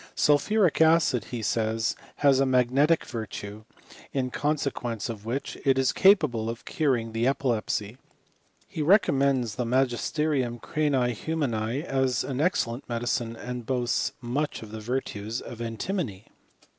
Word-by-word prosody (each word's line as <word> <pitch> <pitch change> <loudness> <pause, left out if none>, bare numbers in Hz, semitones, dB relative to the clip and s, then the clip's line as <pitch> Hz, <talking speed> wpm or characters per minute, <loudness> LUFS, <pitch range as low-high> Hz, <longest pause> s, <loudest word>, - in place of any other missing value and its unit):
Sulphuric 165 +5 +3
acid, 160 -8 +4
he 120 -3 -5
says, 110 +1 0 0.2
has 140 -2 +4
a 135 - +4
magnetic 130 +5 +3
virtue, 110 -1 -6 0.5
in 130 -2 -1
consequence 140 -7 -2
of 110 -2 -7
•which 125 +5 -4
it 135 -1 +3
is 130 -1 +2
capable 150 - +4
of 115 0 -6
curing 125 -7 0
the 115 +2 0
epilepsy. 120 -4 -1 0.7
He 155 - -5
re 180 +8 +7
commends 135 - 0
the 125 - 0
Tnagisterium 130 +1 0
cranii 135 -5 0
humani 125 -2 -2
as 130 -5 0
an 135 0 -3
ex 180 +5 +2
cellent 115 +2 -6
medicine, 120 -1 -1
and 125 0 -6
boasts 125 -2 0
much 130 +3 -2
of 105 - -11
the 110 0 -7
virtues 115 -2 -3
of 120 -1 -9
antimony. 115 - -3
125 Hz, 140 wpm, -27 LUFS, 115-145 Hz, 0.7 s, re